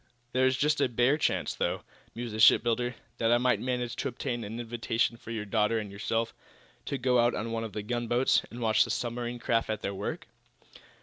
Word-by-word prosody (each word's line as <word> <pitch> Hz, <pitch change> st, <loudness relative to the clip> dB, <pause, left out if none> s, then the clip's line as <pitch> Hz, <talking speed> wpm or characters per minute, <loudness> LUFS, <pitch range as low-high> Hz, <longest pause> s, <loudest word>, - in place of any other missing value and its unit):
"There 130 Hz, +1 st, +3 dB
is 130 Hz, 0 st, +1 dB
just 150 Hz, +2 st, +2 dB
a -, -, +3 dB
bare 120 Hz, +4 st, +3 dB
chance, 155 Hz, -, 0 dB
though," -, -, -2 dB, 0.3 s
mused 120 Hz, -1 st, -5 dB
the 110 Hz, -, -4 dB
shipbuilder, 120 Hz, +2 st, +4 dB, 0.2 s
"that 115 Hz, 0 st, +2 dB
I 120 Hz, -, +6 dB
might 125 Hz, +1 st, +2 dB
manage 125 Hz, -2 st, -2 dB
to -, -, -1 dB
obtain 120 Hz, -1 st, -3 dB
an 110 Hz, +3 st, -6 dB
invitation 115 Hz, 0 st, -1 dB
for 115 Hz, -, -13 dB
your 110 Hz, -2 st, -3 dB
daughter 105 Hz, +2 st, +1 dB
and 105 Hz, -2 st, -4 dB
yourself 115 Hz, +3 st, -2 dB, 0.5 s
to 140 Hz, -, -2 dB
go 125 Hz, -1 st, +2 dB
out 120 Hz, +1 st, +3 dB
on 115 Hz, +2 st, -3 dB
one 115 Hz, 0 st, -2 dB
of 110 Hz, -, -6 dB
the 105 Hz, -, -4 dB
gunboats, 120 Hz, +2 st, +2 dB
and 120 Hz, -, -8 dB
watch 110 Hz, -1 st, +4 dB
the -, -, -6 dB
submarine 120 Hz, 0 st, -2 dB
craft 115 Hz, -1 st, 0 dB
at 110 Hz, -1 st, -3 dB
their 100 Hz, -, -2 dB
work." 95 Hz, -, -4 dB
120 Hz, 210 wpm, -29 LUFS, 115-125 Hz, 0.5 s, I